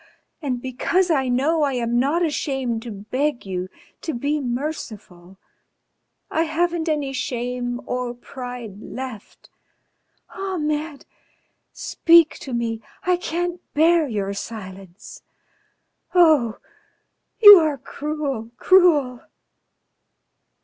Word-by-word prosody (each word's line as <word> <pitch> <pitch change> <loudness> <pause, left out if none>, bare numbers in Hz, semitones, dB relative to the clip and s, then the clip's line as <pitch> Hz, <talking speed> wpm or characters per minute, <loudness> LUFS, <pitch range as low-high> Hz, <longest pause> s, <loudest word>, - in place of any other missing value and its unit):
And 255 -5 -3
because 340 +8 0
I 270 -4 +1
know 280 +6 +1
I 280 -2 +1
am 240 -1 0
not 310 +7 +2
ashamed 270 -6 -2
to 235 - -8
beg 245 +7 -2
you 185 -1 -4 0.3
to 320 - -4
be 285 +5 -1
merciful. 225 - -6 0.9
I 325 +1 +1
haven't 335 +1 -1
any 290 -3 -1
shame 250 -2 -3
or 250 -1 -3
pride 245 -5 -8
left. 255 -5 -9 0.8
Ahmed! 310 -6 -3 0.7
Speak 335 -2 +3
to 270 - -8
me! 230 -2 -2 0.2
I 360 0 +2
can't 350 0 -3
bear 325 +1 +4
your 200 -4 -2
silence.... 195 -3 -9 0.9
Oh! 305 -10 +4 0.8
You 410 -4 +11
are 310 -3 0
cruel, 280 -4 -4
cruel!" 300 -10 +4
270 Hz, 100 wpm, -22 LUFS, 235-315 Hz, 0.9 s, You